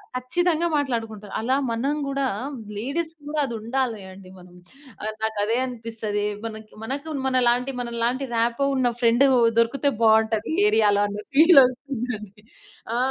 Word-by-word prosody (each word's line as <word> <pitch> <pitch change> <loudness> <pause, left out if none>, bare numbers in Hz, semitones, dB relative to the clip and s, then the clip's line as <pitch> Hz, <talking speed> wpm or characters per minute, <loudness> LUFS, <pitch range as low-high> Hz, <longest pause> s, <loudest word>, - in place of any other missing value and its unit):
ఖచ్చితంగా 335 +6 0
మాట్లాడుకుంటారు. 225 -7 -3
అలా 245 +4 +1
మనం 250 +6 -1
గూడా 275 0 -1 0.5
లేడీస్‌కి 315 +7 -4
గూడా 300 +1 -2
అదుండాలి 235 -1 -2
అండి 185 0 -13
మనం. 180 -1 -16 0.5
ఆహ్, 215 +1 -3
నాకదే 220 +1 0
అనిపిస్తదీ. 225 -4 -4 0.2
మనకి 220 -1 -8
మనకు 280 +7 -4 0.2
మనలాంటి, 250 0 +2
మనలాంటి 240 +2 -1
రాపో 235 +4 +1
ఉన్న 255 -2 +2
ఫ్రెండూ 235 +3 +4 0.3
దొరుకుతే 250 +5 +2
బావుంటదీ 220 +2 +3
ఏరియాలో 210 - +3
అన్న 205 0 -6 0.2
ఫీలొస్తుందండి. 250 - +3 0.5
ఆ! - - 0
235 Hz, 120 wpm, -24 LUFS, 220-270 Hz, 0.5 s, ఫ్రెండూ